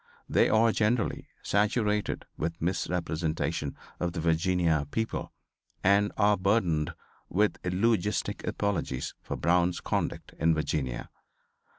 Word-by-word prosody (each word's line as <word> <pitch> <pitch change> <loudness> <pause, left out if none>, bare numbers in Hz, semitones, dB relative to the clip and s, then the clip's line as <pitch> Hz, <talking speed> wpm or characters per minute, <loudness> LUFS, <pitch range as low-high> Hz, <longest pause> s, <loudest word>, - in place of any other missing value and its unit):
They - - +3
are, 110 +1 +5
generally, 110 +2 0 0.2
saturated 105 0 +1
with 85 0 -3
misrepresentation 80 -3 -1 0.2
of 85 -1 -1
the 85 - -3
Virginia 80 -2 +2
people 110 +7 -2 0.5
and 100 +2 +4
are 105 -1 +4
burdened 90 -6 +1 0.3
with 105 +3 +1
eulogistic 105 +2 0
apologies 100 -11 -1
for - - -4
Brown's 85 +1 +2
conduct - - -2
in 80 0 +3
Virginia. 70 -5 -2
90 Hz, 105 wpm, -29 LUFS, 80-105 Hz, 0.5 s, are